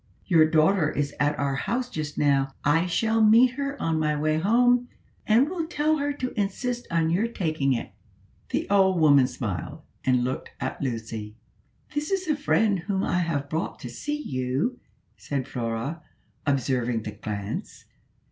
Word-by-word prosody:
Your 160 -4 +5
daughter 160 +1 +3
is 145 -1 -2
at 145 +1 +1
our 140 -1 0
house 245 - -1
just 155 -9 -5
now: 135 -2 +2
I 165 +5 +3
shall 225 +5 +1
meet 230 +4 +6
her 280 +1 -4
on 160 -1 0
my 150 -1 0
way 155 +1 +1
home, 245 +6 +3 0.4
and 230 +6 +5
will 335 -1 -3
tell 310 -1 +1
her 290 0 -1
to 260 -3 -4
insist 240 +4 -2
on 165 -1 +1
your 200 +7 +2
taking 155 - 0
it." 115 - -4 0.6
The - - -1
old 190 -3 +4
woman 140 -4 +6
smiled, 110 - -5 0.2
and 125 -2 +2
looked 130 +1 -4
at - - -4
Lucy. 110 -4 -4 0.6
"This 295 0 -2
is 385 -2 -1
a 305 - +2
friend 220 -9 +2
whom 190 +3 -2
I 175 - +1
have 155 -5 -1
brought 160 +3 -3
to 125 - -6
see 295 - -3
you," 135 - -2 0.4
said 140 -2 -3
Flora, 120 +5 -3 0.5
observing 125 -4 0
the 110 - -5
glance. 100 - -6
160 Hz, 165 wpm, -26 LUFS, -, 0.6 s, meet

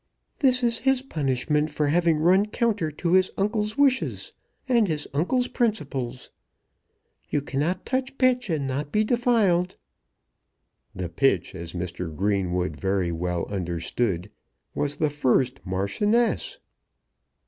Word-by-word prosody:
"This 255 -3 +3
is 235 -1 +1
his 265 -1 +2
punishment 150 - 0
for 150 0 0
having 170 0 +3
run 185 +6 +4
counter 215 -7 0
to 165 +3 -3
his 185 0 +4
uncle's 210 +1 -1
wishes 275 -2 +1 0.3
and 235 -5 +3
his 155 -3 -2
uncle's 245 - +1
principles. 140 - -2 1.0
You 145 - +1
cannot 150 +7 -2
touch 265 +1 -2
pitch 250 -3 +2
and 155 -4 0
not 140 +2 -3
be 215 - +3
defiled." 215 -7 +2 1.2
The 90 -1 -3
pitch, 135 +11 +1
as 85 -2 -7
Mr. 90 -2 -5
Greenwood 90 -3 0
very 95 0 0
well 85 +1 -2
understood, 90 +1 -2 0.4
was 145 0 -1
the 155 -1 0
first 130 -2 +1
Marchioness. 205 - 0
150 Hz, 125 wpm, -25 LUFS, -, 1.2 s, run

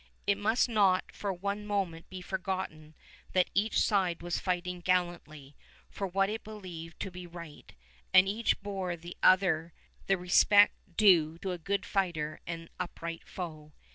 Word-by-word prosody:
It 200 0 +2
must 220 +5 +2
not 200 -5 +2
for 200 - -3
one 200 +3 -3
moment 195 -6 -2
be 185 -1 -7
forgotten 185 -5 -4 0.4
that 185 -1 +2
each 210 +3 +2
side 185 -5 +1
was 175 0 -1
fighting 180 -1 -2
gallantly 170 -6 -2 0.4
for 195 - -3
what 195 +2 +1
it 220 +2 -4
believed 180 -6 -9
to 195 - -4
be 180 0 -8
right, 170 -3 -11 0.4
and 185 +1 +7
each 220 +4 +1
bore 190 -3 -3
the 170 +1 -10
other 175 -3 +4 0.3
the 195 - +3
respect 205 +3 +5 0.2
due 170 -7 +5
a 185 -2 -3
good 200 +4 -1
fighter 165 -6 -1
and 165 -1 -6
upright 165 -1 -5
foe. 155 -4 -7
180 Hz, 150 wpm, -31 LUFS, 170-195 Hz, 0.4 s, and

